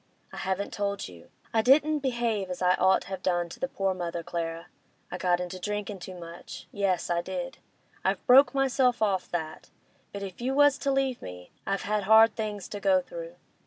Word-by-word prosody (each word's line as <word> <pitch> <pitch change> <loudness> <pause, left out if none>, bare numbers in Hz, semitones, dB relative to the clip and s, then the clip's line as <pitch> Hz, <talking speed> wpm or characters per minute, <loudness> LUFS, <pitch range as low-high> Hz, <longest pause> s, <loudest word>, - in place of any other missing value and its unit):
I - - -8
haven't 190 +1 -2
told 200 -1 -2
you. 85 -2 -14 0.2
I 225 - +4
didn't 295 +5 +4
behave 235 -7 -1
as 180 - -5
I'd 180 0 +3
ought 190 +1 +4
have 190 0 -6
done 175 -2 0
to - - -10
the 265 - -1
poor 195 -6 -1
mother, 170 -2 -4
Clara; 165 0 -4 0.5
I 180 - -5
got 180 -1 +2
into 180 +1 -5
drinkin' 205 +1 -4
too 185 +1 -8
much; 170 -1 -9
yes, 195 -3 0
I 170 0 +1
did. - - -5 0.4
I've - - 0
broke 265 +3 +7
myself 260 -3 +2
off 195 -3 0
that; 160 -2 -5 0.4
but 200 0 -6
if 195 +2 -8
you 260 +2 -1
was 290 -1 +5
to 280 - 0
leave 270 -2 0
me—I've 90 - -6
had 210 -1 -1
hard 220 +1 +7
things 210 -3 -4
to 205 - -5
go 285 +4 +4
through. - - -8
200 Hz, 195 wpm, -28 LUFS, 180-250 Hz, 0.5 s, broke